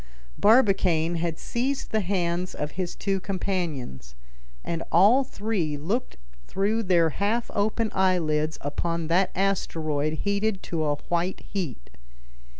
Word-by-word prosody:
Barbicane 190 Hz, -7 st, +4 dB
had 165 Hz, -1 st, -2 dB
seized 265 Hz, +3 st, -2 dB
the 220 Hz, -, +2 dB
hands 180 Hz, -2 st, -1 dB
of 150 Hz, 0 st, -3 dB
his 185 Hz, -2 st, -4 dB
two 195 Hz, -1 st, -1 dB
companions, 170 Hz, -, -3 dB, 0.5 s
and 165 Hz, -1 st, -3 dB
all 210 Hz, +10 st, +6 dB
three 200 Hz, -, -2 dB
looked 200 Hz, -, -2 dB, 0.3 s
through 210 Hz, +4 st, 0 dB
their 175 Hz, -5 st, +3 dB
half 215 Hz, +8 st, -1 dB
open 215 Hz, +2 st, 0 dB
eyelids 160 Hz, -5 st, +1 dB
upon 165 Hz, +3 st, -2 dB
that 180 Hz, +2 st, +3 dB
asteroid 155 Hz, -6 st, 0 dB
heated 200 Hz, 0 st, 0 dB
to 165 Hz, -2 st, -2 dB
a 145 Hz, -1 st, +1 dB
white 175 Hz, +2 st, 0 dB
heat. 155 Hz, -, -4 dB
180 Hz, 125 wpm, -26 LUFS, 160-200 Hz, 0.5 s, all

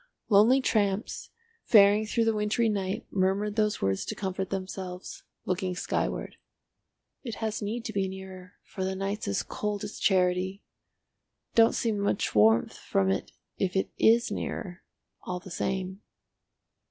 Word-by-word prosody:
Lonely 225 Hz, +6 st, +6 dB
tramps 205 Hz, -4 st, 0 dB, 0.3 s
faring 210 Hz, 0 st, +6 dB
through 230 Hz, +2 st, +1 dB
the 225 Hz, -, +3 dB
wintry 210 Hz, +2 st, +1 dB
night 195 Hz, -2 st, -2 dB
murmured 195 Hz, +2 st, +1 dB
those 215 Hz, -, +1 dB
words 95 Hz, 0 st, +1 dB
to -, -, -4 dB
comfort 190 Hz, -1 st, -3 dB
themselves—looking 185 Hz, 0 st, -5 dB
skyward. -, -, -2 dB, 0.8 s
"It 235 Hz, -4 st, -5 dB
has 220 Hz, -1 st, -3 dB
need 225 Hz, +3 st, -3 dB
to 220 Hz, -, -4 dB
be 195 Hz, -1 st, 0 dB
nearer, 190 Hz, -1 st, -9 dB
for 190 Hz, -, -6 dB
the 190 Hz, 0 st, -1 dB
night's 195 Hz, +2 st, -3 dB
as 100 Hz, -, 0 dB
cold 210 Hz, 0 st, -3 dB
as 205 Hz, -, -6 dB
charity. 185 Hz, +1 st, +1 dB, 0.9 s
Don't 225 Hz, 0 st, +5 dB
seem 220 Hz, -3 st, 0 dB
much 200 Hz, 0 st, 0 dB
warmth 110 Hz, +2 st, +4 dB
from 95 Hz, 0 st, +1 dB
it 95 Hz, -, -2 dB, 0.3 s
if 185 Hz, -1 st, 0 dB
it 190 Hz, -, 0 dB
is 235 Hz, +2 st, +4 dB
nearer, 175 Hz, -1 st, -4 dB, 0.4 s
all 180 Hz, 0 st, -4 dB
the 190 Hz, +1 st, -12 dB
same." 190 Hz, +2 st, -3 dB
195 Hz, 140 wpm, -28 LUFS, 185-210 Hz, 0.9 s, Lonely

